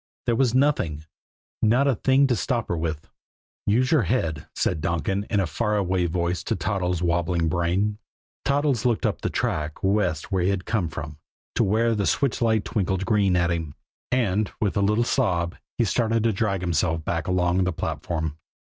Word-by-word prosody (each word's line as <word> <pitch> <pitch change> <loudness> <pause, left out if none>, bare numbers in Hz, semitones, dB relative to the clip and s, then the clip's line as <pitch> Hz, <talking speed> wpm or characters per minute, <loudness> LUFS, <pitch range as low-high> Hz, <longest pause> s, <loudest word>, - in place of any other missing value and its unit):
There 120 - +2
was 125 -1 +2
nothing 90 - +1 0.6
not 120 +6 +3
a 135 - +4
thing 135 +5 +3
to 130 -3 +2
stop 120 +1 -1
her 85 - 0
with. 80 -2 -3 0.6
"Use 125 +5 +2
your 155 -4 +5
head," 80 - -1
said 80 - 0
Donkin 90 +6 -1
in 105 - +1
a 95 - +2
far 105 +7 -1
away 95 -2 +1
voice 85 0 -1
to - - 0
Toddles' 90 -3 -1
wobbling 85 0 +1
brain. 90 +5 0 0.4
Toddles 140 -4 +1
looked 120 -3 +1
up - - -1
the - - -1
track 75 0 -2
west 95 -6 0
where 95 -1 +1
he 90 - +2
had 95 -2 -1
come 100 -8 0
from 75 -1 -7 0.3
to - - +2
where 115 +4 +2
the 105 -2 0
switch 140 -4 +1
light 110 -4 +2
twinkled 95 -1 -1
green 100 -4 +2
at 85 -1 +2
him 80 -4 -3 0.4
and, 110 -5 +1
with 105 -1 0
a 100 - +2
little 105 +4 +2
sob, 85 -6 0 0.2
he 120 - +3
started 115 +1 +1
to 115 -1 +2
drag 100 -3 0
himself 80 -2 0
back 85 -2 -2
along 90 0 +2
the 90 - 0
platform. 80 -2 -3
95 Hz, 185 wpm, -24 LUFS, 85-115 Hz, 0.6 s, your